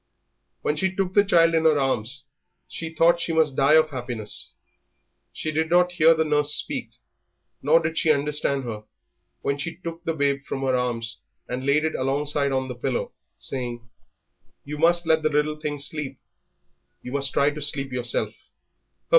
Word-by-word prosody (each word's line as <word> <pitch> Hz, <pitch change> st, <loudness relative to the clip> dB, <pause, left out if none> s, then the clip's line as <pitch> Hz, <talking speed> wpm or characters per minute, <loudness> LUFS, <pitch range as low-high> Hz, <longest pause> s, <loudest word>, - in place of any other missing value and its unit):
When 150 Hz, -, 0 dB
she 190 Hz, +3 st, 0 dB
took 190 Hz, -1 st, -1 dB
the 205 Hz, -, +5 dB
child 165 Hz, -4 st, +4 dB
in 160 Hz, -1 st, +2 dB
her 155 Hz, -2 st, +5 dB
arms 135 Hz, -1 st, -1 dB, 0.4 s
she 165 Hz, -, -6 dB
thought 165 Hz, +2 st, +3 dB
she 165 Hz, -, -1 dB
must 155 Hz, -4 st, +2 dB
die 140 Hz, +3 st, +4 dB
of 155 Hz, -1 st, +4 dB
happiness. 120 Hz, -5 st, -3 dB, 0.8 s
She 155 Hz, -, -4 dB
did 160 Hz, +1 st, 0 dB
not 180 Hz, +1 st, +4 dB
hear 165 Hz, -2 st, +5 dB
the 160 Hz, 0 st, +1 dB
nurse 150 Hz, -1 st, +2 dB
speak, -, -, -2 dB, 0.7 s
nor 155 Hz, +4 st, +5 dB
did 160 Hz, 0 st, -2 dB
she 160 Hz, -, +1 dB
understand 145 Hz, -1 st, +1 dB
her 110 Hz, -3 st, -6 dB, 0.6 s
when 140 Hz, 0 st, -1 dB
she 165 Hz, +3 st, -4 dB
took 170 Hz, -1 st, -8 dB
the 165 Hz, -2 st, -2 dB
babe 140 Hz, -2 st, 0 dB
from 135 Hz, -, -4 dB
her 135 Hz, -1 st, +1 dB
arms 120 Hz, -2 st, -2 dB, 0.3 s
and 130 Hz, +2 st, -4 dB
laid 150 Hz, +2 st, +3 dB
it 160 Hz, -, -1 dB
alongside 140 Hz, +1 st, 0 dB
on 130 Hz, 0 st, -1 dB
the 125 Hz, -, -5 dB
pillow, 485 Hz, -, -3 dB, 0.3 s
saying, 120 Hz, -3 st, -5 dB, 0.8 s
"You 150 Hz, +1 st, -7 dB
must 170 Hz, +1 st, +3 dB
let 160 Hz, -1 st, +3 dB
the 155 Hz, -, +1 dB
little 150 Hz, +1 st, 0 dB
thing 150 Hz, -1 st, -3 dB
sleep, 140 Hz, -1 st, -4 dB, 0.9 s
you 125 Hz, -, -7 dB
must 140 Hz, 0 st, 0 dB
try 145 Hz, +1 st, +2 dB
to 150 Hz, +1 st, -8 dB
sleep 140 Hz, -2 st, 0 dB
yourself." 125 Hz, -1 st, -1 dB
150 Hz, 175 wpm, -24 LUFS, 135-160 Hz, 0.9 s, the